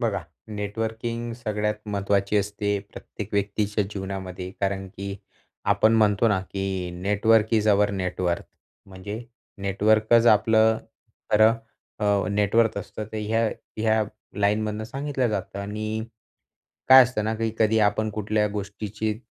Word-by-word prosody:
बघा. 105 Hz, -6 st, -1 dB, 0.3 s
नेटवर्किंग 115 Hz, +3 st, -3 dB
सगळ्यात 105 Hz, -2 st, -2 dB, 0.2 s
महत्त्वाची 100 Hz, +1 st, +1 dB
असते 105 Hz, 0 st, 0 dB
प्रत्येक 105 Hz, -1 st, -8 dB
व्यक्तीच्या 105 Hz, +1 st, 0 dB
जीवनामध्ये. 95 Hz, -2 st, -5 dB
कारण 95 Hz, 0 st, -1 dB
की 100 Hz, +1 st, -6 dB, 0.6 s
आपण 110 Hz, +1 st, +3 dB
म्हणतो 105 Hz, +1 st, +3 dB
ना, 100 Hz, -3 st, +2 dB
की 95 Hz, -1 st, -3 dB
network 105 Hz, +3 st, +3 dB
is 110 Hz, -1 st, +2 dB
our 105 Hz, 0 st, +4 dB
net 95 Hz, -2 st, -3 dB
worth. 85 Hz, -1 st, 0 dB, 0.4 s
म्हणजे 100 Hz, +4 st, -7 dB, 0.4 s
नेटवर्कच 110 Hz, +4 st, +3 dB
आपलं 110 Hz, +1 st, +3 dB, 0.5 s
खरं 110 Hz, +1 st, +6 dB, 0.4 s
अ, 105 Hz, -, -2 dB, 0.3 s
नेट 100 Hz, 0 st, 0 dB
वर्थ 115 Hz, -2 st, +4 dB
असतं. 105 Hz, +2 st, -6 dB
तर -, -, -4 dB
ह्या 110 Hz, +2 st, +1 dB, 0.3 s
ह्या 110 Hz, 0 st, +2 dB, 0.4 s
लाईनमधनं 105 Hz, +1 st, 0 dB
सांगितलं 135 Hz, 0 st, -2 dB
जातं. 100 Hz, -2 st, -4 dB
आणि 110 Hz, +2 st, -3 dB, 0.8 s
काय 130 Hz, 0 st, +11 dB
असतं 125 Hz, -4 st, -1 dB
ना, 110 Hz, +1 st, 0 dB
की 115 Hz, 0 st, -1 dB
कधी 110 Hz, 0 st, +3 dB
आपण 105 Hz, +1 st, +2 dB
कुठल्या 105 Hz, 0 st, 0 dB
गोष्टीची 105 Hz, +1 st, -4 dB
105 Hz, 130 wpm, -25 LUFS, 100-110 Hz, 0.8 s, काय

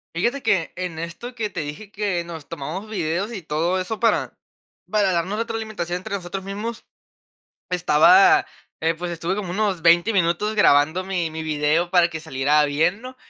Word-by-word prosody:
Fíjate, 240 Hz, +11 st, 0 dB
que 205 Hz, -8 st, +1 dB
en 180 Hz, -3 st, -4 dB
esto 170 Hz, +10 st, -7 dB
que 220 Hz, -3 st, -2 dB
te 180 Hz, -, -6 dB
dije, 155 Hz, +7 st, -7 dB
que 200 Hz, -5 st, -1 dB
nos 165 Hz, -3 st, -9 dB
tomamos 165 Hz, +10 st, -6 dB
videos, 190 Hz, +2 st, -2 dB
y 200 Hz, -, -5 dB
todo 165 Hz, +4 st, -1 dB
eso, 210 Hz, +4 st, -4 dB
para 230 Hz, -, +2 dB, 0.6 s
para 205 Hz, -2 st, +2 dB
darnos 180 Hz, +5 st, -1 dB
retroalimentación, 220 Hz, -6 st, -3 dB
entre 200 Hz, +3 st, -5 dB
nosotros 190 Hz, 0 st, -5 dB
mismos. 215 Hz, +4 st, -5 dB, 0.8 s
Estaba, 360 Hz, -, +5 dB, 0.4 s
eh, 165 Hz, +1 st, +2 dB
pues 175 Hz, +2 st, -5 dB
estuve 170 Hz, +2 st, -2 dB
como 190 Hz, -4 st, -4 dB
unos 195 Hz, -2 st, 0 dB
20 170 Hz, +6 st, +5 dB
minutos, 190 Hz, +3 st, +1 dB
grabando 160 Hz, -1 st, +4 dB
mi 180 Hz, -4 st, -2 dB
mi 160 Hz, 0 st, -5 dB
video, 155 Hz, +2 st, +1 dB
para 175 Hz, -2 st, +4 dB
que 160 Hz, -1 st, -6 dB
saliera 150 Hz, -1 st, +2 dB
bien, 160 Hz, +8 st, +1 dB
¿no? 255 Hz, +1 st, -9 dB
180 Hz, 170 wpm, -22 LUFS, 165-210 Hz, 0.8 s, Estaba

